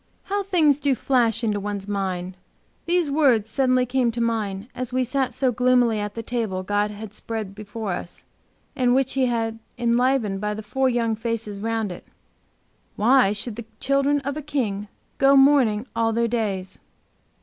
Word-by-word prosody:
How 405 +1 -1
things 325 -8 +3
do 280 -2 +1
flash 240 -3 +1
into 210 -2 0
one's 200 -1 -4
mind. 190 -2 -3 0.5
These 345 -4 +1
words 250 -8 +3
suddenly 255 -1 +2
came 250 -1 +1
to 235 - -4
mine, 220 -3 -1
as 255 -1 -4
we 255 0 +1
sat 260 +1 -1
so 260 -2 0
gloomily 245 -2 +3
at 205 0 -4
the 230 - -4
table 220 -6 -2
God 205 +2 0
had 210 0 -8
spread 215 -3 -5
for 215 -2 -4
us, 175 0 -6 0.5
and 250 -2 +2
which 265 -1 +1
He 265 -1 +2
had 225 -2 -1 0.2
enlivened 235 -4 +1
by 210 0 -1
the 215 - -7
four 265 +5 +1
young 230 -2 0
faces 225 -2 -3
around 225 -1 -2
it 175 - -10 0.9
"Why 240 -1 +4
should 210 +2 -3
the 235 - -6
children 275 +1 +2
of 280 +1 -3
a 305 - -4
King 220 -9 -2 0.3
Go 275 +1 +6
mourning 270 -6 +4
all 225 0 +1
their 235 +1 +1
days?" 205 -5 -2
230 Hz, 170 wpm, -23 LUFS, 210-260 Hz, 0.9 s, Go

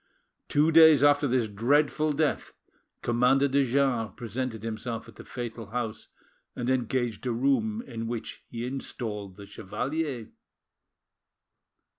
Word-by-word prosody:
Two 150 +3 +3
days 160 -3 +8
after 145 0 +5
this 125 -3 +1
dreadful 145 +8 +2
death, 150 +1 -1 0.5
Commander 125 +4 +3
de 140 +1 +2
Jars 130 -3 +1
presented 120 -2 -4
himself 115 +1 -4
at 115 - -14
the - - -11
fatal 120 -2 -6
house, 115 -1 -4 0.5
and 125 +1 -1
engaged 125 -2 -1
a - - +1
room 140 - +1
in 115 -2 -5
which 115 -1 -5
he 120 0 -5
installed 110 -7 -5
the 100 - -10
chevalier. 120 +6 -4
125 Hz, 125 wpm, -28 LUFS, 115-140 Hz, 0.5 s, days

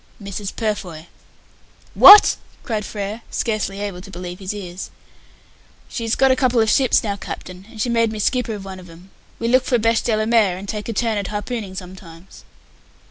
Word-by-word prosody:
"Mrs. 200 -1 -6
Purfoy." 190 -8 -4 0.9
"What!" 415 +1 +9 0.3
cried 215 -4 -3
Frere, 210 +2 -5
scarcely 215 -3 -2
able 200 -3 -5
to 195 - -13
believe 180 -1 -8
his 190 -1 -4
ears. 190 -3 -7 1.0
"She's 230 -2 -2
got 265 0 +4
a - - +4
couple 255 -2 +1
of 220 -1 +3
ships 265 -3 +3
now, 205 -2 -2
Captain, 185 -1 -9
and 225 -2 -13
she 215 - 0
made 230 -2 +1
me 220 - -6
skipper 235 +1 -1
of 195 -2 -9
one 190 -1 -8
of 180 -1 -14
'em. 175 +3 -16 0.3
We 230 - -3
look 255 +2 +3
for 250 - +1
beshdellamare 225 - -5
[beche 230 - 0
de 225 -3 +1
la 215 - 0
mer], 220 -5 +2
and 195 +2 -9
take 210 +1 -5
a - - -2
turn 220 -1 0
at 200 - -4
harpooning 210 -2 -5
sometimes." 180 -1 -11
210 Hz, 195 wpm, -20 LUFS, 190-230 Hz, 1.0 s, What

